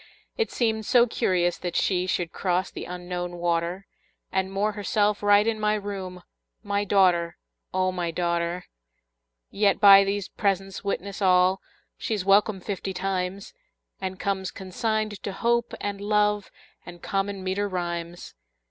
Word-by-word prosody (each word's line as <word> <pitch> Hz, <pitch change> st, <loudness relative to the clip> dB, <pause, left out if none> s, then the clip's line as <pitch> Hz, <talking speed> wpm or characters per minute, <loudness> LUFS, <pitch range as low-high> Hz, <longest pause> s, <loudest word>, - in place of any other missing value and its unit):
It 455 Hz, -, 0 dB
seemed 220 Hz, -3 st, 0 dB
so 245 Hz, -2 st, +6 dB
curious 175 Hz, -6 st, 0 dB
that 175 Hz, -1 st, -4 dB
she 180 Hz, -1 st, +1 dB
Should 175 Hz, -2 st, -1 dB
cross 180 Hz, -1 st, -1 dB
the -, -, -7 dB
Unknown 180 Hz, 0 st, -5 dB
water, 170 Hz, +2 st, -1 dB, 0.5 s
And 190 Hz, 0 st, -1 dB
moor 205 Hz, +2 st, 0 dB
herself 205 Hz, 0 st, 0 dB
right 205 Hz, 0 st, +5 dB
in 225 Hz, -1 st, 0 dB
my 210 Hz, 0 st, +2 dB
room, 190 Hz, -3 st, -6 dB, 0.4 s
My 200 Hz, -1 st, 0 dB
daughter, 180 Hz, -4 st, +3 dB, 0.3 s
O 185 Hz, 0 st, +1 dB
my 175 Hz, -2 st, -2 dB
daughter! 170 Hz, +1 st, -1 dB, 0.9 s
Yet 200 Hz, -1 st, +2 dB
by 200 Hz, -1 st, +9 dB
these 200 Hz, 0 st, -2 dB
presents 195 Hz, -1 st, -2 dB
witness 200 Hz, 0 st, -3 dB
all 185 Hz, 0 st, +4 dB, 0.4 s
She's 210 Hz, -4 st, -2 dB
welcome 200 Hz, 0 st, +3 dB
fifty 195 Hz, -1 st, -4 dB
times, 190 Hz, -, -3 dB, 0.5 s
And 190 Hz, -1 st, -5 dB
comes 190 Hz, -1 st, -1 dB
consigned 215 Hz, +2 st, -3 dB
to 200 Hz, -, -4 dB
Hope 235 Hz, +3 st, +1 dB
and 200 Hz, -1 st, -4 dB
Love 210 Hz, 0 st, +1 dB, 0.3 s
And 175 Hz, -1 st, -12 dB
common 195 Hz, 0 st, -2 dB
meter 195 Hz, +2 st, -1 dB
rhymes. 175 Hz, -1 st, -4 dB
195 Hz, 140 wpm, -26 LUFS, 180-205 Hz, 0.9 s, by